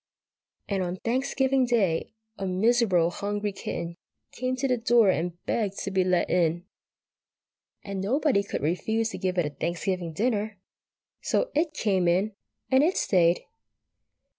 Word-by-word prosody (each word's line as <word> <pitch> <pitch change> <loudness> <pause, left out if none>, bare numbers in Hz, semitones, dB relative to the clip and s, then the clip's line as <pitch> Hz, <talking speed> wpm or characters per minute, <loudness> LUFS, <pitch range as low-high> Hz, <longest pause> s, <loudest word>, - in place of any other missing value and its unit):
And 195 -2 -1
on 180 0 -2
Thanksgiving 260 +4 +1
Day 195 -9 +1 0.2
a 195 - -4
miserable 185 -3 +3
hungry 205 +2 -2
kitten 170 -3 -5 0.3
came 255 +1 -2
to 265 +2 -1
the 250 -1 +1
door 230 -3 +5
and 175 0 -2
begged 205 -4 -1
to 195 - -3
be 190 -1 +2
let 180 -1 +2
in, 170 0 +1 1.2
and 195 -1 -4
nobody 255 +2 +2
could 200 - -5
refuse 220 +8 0
to - - -7
give 185 -1 -1
it 175 - +2
a 150 - -3
Thanksgiving 170 +3 -2
dinner, 215 +2 -1 0.6
so - - 0
it 305 0 0
came 190 -7 +1
in, 190 +5 +2 0.4
and 260 +1 +6
it 350 +4 +2
stayed. 175 -2 +3
200 Hz, 145 wpm, -27 LUFS, 180-235 Hz, 1.2 s, and